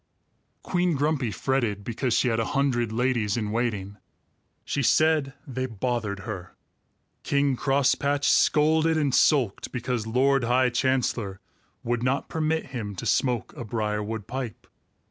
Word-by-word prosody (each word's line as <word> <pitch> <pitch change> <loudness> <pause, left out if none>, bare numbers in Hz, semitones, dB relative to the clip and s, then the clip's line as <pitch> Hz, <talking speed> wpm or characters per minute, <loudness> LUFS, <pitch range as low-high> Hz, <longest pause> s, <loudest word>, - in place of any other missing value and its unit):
Queen 175 -2 +1
Grumpy 140 -3 0
fretted 115 -4 -1
because 120 +2 -1
she 125 - +2
had 115 -1 0
a 115 - 0
hundred 120 -5 +1
ladies 120 -3 0
in 105 -2 -2
waiting. 105 -4 -2 0.7
She 140 - -1
said 150 0 +3
they 130 -2 -3
bothered 110 -3 -2
her. 95 -4 -7 0.7
King 140 -1 +1
Crosspatch 140 +2 +1
scolded 160 +1 +3
and 145 -4 +1
sulked 130 -11 +2
because 120 -2 -3
Lord 135 +3 +2
High 125 +1 +3
Chancellor 120 -6 0 0.4
would 120 0 -1
not 130 +3 -1
permit 160 0 -1
him 105 -5 -4
to - - -6
smoke 125 -4 0
a - - -6
briarwood 105 -1 -3
pipe. 130 -4 -6
125 Hz, 135 wpm, -26 LUFS, 110-140 Hz, 0.7 s, said